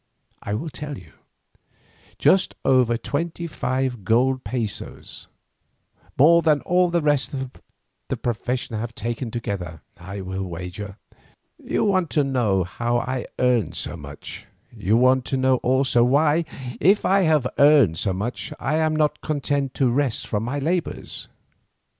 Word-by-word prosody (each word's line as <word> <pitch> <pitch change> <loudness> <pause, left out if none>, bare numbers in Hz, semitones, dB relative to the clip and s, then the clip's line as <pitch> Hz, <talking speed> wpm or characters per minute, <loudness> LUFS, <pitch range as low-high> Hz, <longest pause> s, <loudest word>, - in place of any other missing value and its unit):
I 100 - -3
will 155 +8 -4
tell 145 -2 -6
you; 85 -5 -15 1.0
just 190 - +3
over 125 -3 +4
twenty 165 +7 -3
five 130 - -2
gold 130 +6 +2
pesos, 115 -5 -5 0.9
more 170 +5 +6
than 150 -3 +3
all 180 0 +2
the 170 -2 0
rest 145 -2 +1
of 130 -1 -4 0.6
the - - -2
profession 120 +1 -2
have 115 0 -5
taken 120 +1 -3
together, 100 -8 -5 0.2
I 95 +3 -7
will 95 +1 -4
wager. 90 +3 -6 0.7
You - - 0
want 185 -5 +2
to 145 - +5
know 120 -9 +1
how 120 +7 -1
I 130 +1 -3
earn 125 -7 +2
so - - -4
much; 75 -2 -9 0.3
you 105 +1 +2
want 130 +1 +4
to 135 - -1
know 130 0 +3
also, 130 -1 +2
why, 150 +6 +3 0.3
if 195 +7 +4
I 195 +1 +4
have 155 -6 +3
earned 140 - +5
so 100 - 0
much, 100 +7 -3
I 150 +3 0
am 155 -1 +1
not 150 -1 +1
content 140 -2 -1
to 130 -3 +2
rest 130 -2 0
from 105 - -2
my 125 +5 -3
labours. 165 +5 -2
130 Hz, 145 wpm, -23 LUFS, 110-150 Hz, 1.0 s, more